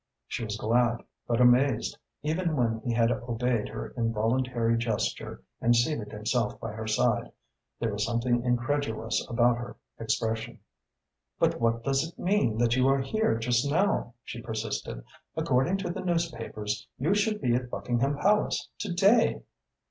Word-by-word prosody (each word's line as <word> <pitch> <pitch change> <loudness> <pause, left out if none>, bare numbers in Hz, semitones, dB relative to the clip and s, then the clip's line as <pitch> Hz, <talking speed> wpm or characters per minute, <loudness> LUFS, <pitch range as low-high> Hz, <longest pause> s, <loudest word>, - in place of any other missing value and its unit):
She - - -4
was 105 -1 -3
glad 120 +2 +2 0.2
but 120 0 +1
amazed. 125 0 +4 0.3
Even 160 +2 0
when 115 -4 +1
he 120 - -3
had 115 0 +3
obeyed 120 -2 -1
her - - -6
involuntary 115 +1 +1
gesture 115 -2 -2 0.2
and 120 +1 +4
seated 120 -2 0
himself 105 +1 -1
by 115 - -5
her 110 +1 -6
side, 110 - +1 0.5
there 115 -2 0
was 105 +1 -1
something 120 +1 +1
incredulous 120 -2 0
about 120 0 +3
her 120 -1 -7 0.2
expression. 110 0 -2 0.8
"But - - +1
what 115 0 +1
does 135 +2 +1
it 165 +1 -8
mean 180 - +1
that 120 0 +3
you 130 0 +3
are 135 0 +4
here 215 - +1
just 120 +3 +1
now?" 165 - +1
she 115 - -7
persisted. 110 - -4 0.3
"According 135 +10 +2
to 185 -3 -3
the 190 - -4
newspapers 155 - -2
you 155 +9 +1
should 210 +1 +1
be 120 - +1
at 125 0 -1
Buckingham 125 +4 0
Palace 210 +6 +1
to 210 - -3
day." 200 +6 +4
120 Hz, 155 wpm, -28 LUFS, 115-145 Hz, 0.8 s, amazed